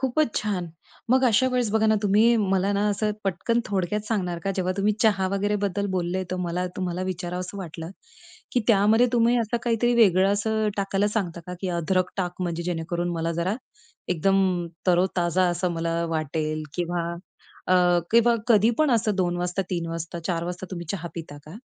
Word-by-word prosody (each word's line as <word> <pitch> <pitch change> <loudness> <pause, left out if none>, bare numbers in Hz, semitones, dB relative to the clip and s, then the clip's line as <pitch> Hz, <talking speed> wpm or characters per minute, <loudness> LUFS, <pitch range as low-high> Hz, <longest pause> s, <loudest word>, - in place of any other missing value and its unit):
खूपच 265 0 +1
छान. 195 -5 -1 0.4
मग 260 +1 +4
अशा 235 +3 +3
वेळेस 245 -4 +1
बघा 220 0 +3
ना, 220 - +4
तुम्ही 215 +4 +4 0.2
मला 195 +1 +2
ना 205 +1 +1
असं 210 +1 0
पटकन 195 +6 0
थोडक्यात 195 +1 -1
सांगणार 180 -6 -1
का 195 - 0
जेव्हा 185 0 0
तुम्ही 205 +1 +2
चहा 205 -4 +3
वगैरे 205 +2 0
बद्दल 200 +1 -1
बोलले 180 +1 -1
तर 185 - -2
मला 180 +2 -1
तुम्हाला 180 -1 -2
विचारावसं 180 +1 -4
वाटलं 165 -2 -7 0.6
की 250 - +2
त्यामध्ये 220 +3 +5
तुम्ही 235 +1 +3
असं 230 +1 0
काहीतरी 240 0 +2
वेगळं 195 -4 +5
असं 215 +1 0
टाकायला 200 0 0
सांगता 190 -6 -2
का 180 - -5
की 190 - -2
अद्रक 180 +2 0
टाक 180 -1 -3
म्हणजे 170 -1 -2
जेणेकरून 175 0 -2
मला 165 0 -1
जरा 170 +4 -1 0.5
एकदम 185 0 +2 0.2
तरोताजा 180 0 +2
असं 175 +1 -1
मला 165 0 -1
वाटेल 155 0 -2
किंवा 175 0 -1 0.7
अ, 185 - +5 0.4
किंवा 235 +1 +5
कधी 220 -1 +5
पण 310 -2 +3
असं 220 -3 +2
2:00 175 -2 0
वाजता 180 +2 -1
3:00 170 -2 -2
वाजता 165 +1 -5
4:00 170 -2 -1
वाजता 180 +2 -5
तुम्ही 175 -3 -6
चहा 175 -3 -4
पिता 160 -3 -7
का? 160 +7 -9
185 Hz, 175 wpm, -25 LUFS, 175-210 Hz, 0.7 s, त्यामध्ये